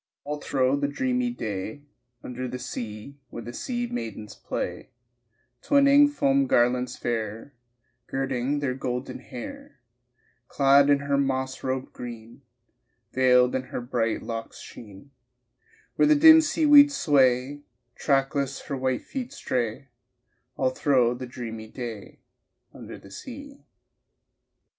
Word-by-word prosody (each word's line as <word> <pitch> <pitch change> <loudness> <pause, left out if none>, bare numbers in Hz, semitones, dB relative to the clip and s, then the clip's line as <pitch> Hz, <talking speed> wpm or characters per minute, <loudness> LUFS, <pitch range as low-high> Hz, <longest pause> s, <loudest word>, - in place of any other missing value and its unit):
All 150 +1 -5
thro' 130 -1 +1
the 140 0 0
dreamy 250 - -1
day 110 - -5 0.4
Under 125 +1 -5
the 125 +1 -5
sea 120 +1 -7
Where 120 - -8
the 120 - -8
sea 240 - -3
maidens 110 - -6
play, - - -5 0.7
Twining 280 +1 +5
foam 275 -1 +1
garlands 125 - +1
fair, 115 +2 -4 0.5
Girding 135 +1 -2
their 135 -3 -1
golden 125 0 -4
hair, 280 - -10 0.7
Clad 140 +1 +4
in 140 -1 +4
her 140 -1 0
moss 130 -1 -1
robe 130 0 -3
green 115 -2 -9 0.7
Veiled 125 -1 +4
in 130 0 -2
her - - -5
bright 120 -2 -2
locks' 115 -1 -6
sheen 105 +5 -13 0.9
Where - - +4
the 305 - +6
dim 320 +2 +8
seaweeds 290 -2 +5
sway, 135 -1 +2 0.3
Trackless 135 0 0
her 140 - -5
white 130 -1 -1
feet 255 -2 -6
stray 125 - -3 0.7
All 130 -1 +1
thro' 130 -3 +2
the 125 +1 -7
dreamy 115 -3 -7
day 115 -3 -8 0.5
Under - - -10
the 100 - -16
sea. 280 - -10
130 Hz, 125 wpm, -26 LUFS, 120-150 Hz, 0.9 s, dim